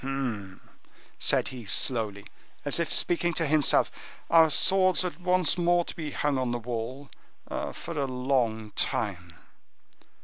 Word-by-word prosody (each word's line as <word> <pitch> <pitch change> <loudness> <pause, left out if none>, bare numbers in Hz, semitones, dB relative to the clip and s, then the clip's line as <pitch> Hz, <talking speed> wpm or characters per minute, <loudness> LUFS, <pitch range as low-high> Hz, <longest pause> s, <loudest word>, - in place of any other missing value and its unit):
"Humph!" 120 -9 -4 0.6
said - - +2
he 125 -2 -9
slowly, 105 -2 +1 0.4
as - - +1
if - - -1
speaking 175 -1 +1
to 165 - 0
himself; 150 0 +3 0.4
"our 165 -1 +6
swords 185 +4 +4
are 180 - -3
once 180 -2 +2
more 175 0 +2
to - - -8
be 160 -4 -5
hung 145 -2 -1
on 130 -1 -1
the 120 - -1
wall—for 125 +6 -7
a 140 - 0
long 125 -4 -1
time!" 90 -8 -2
135 Hz, 135 wpm, -27 LUFS, 115-165 Hz, 0.6 s, our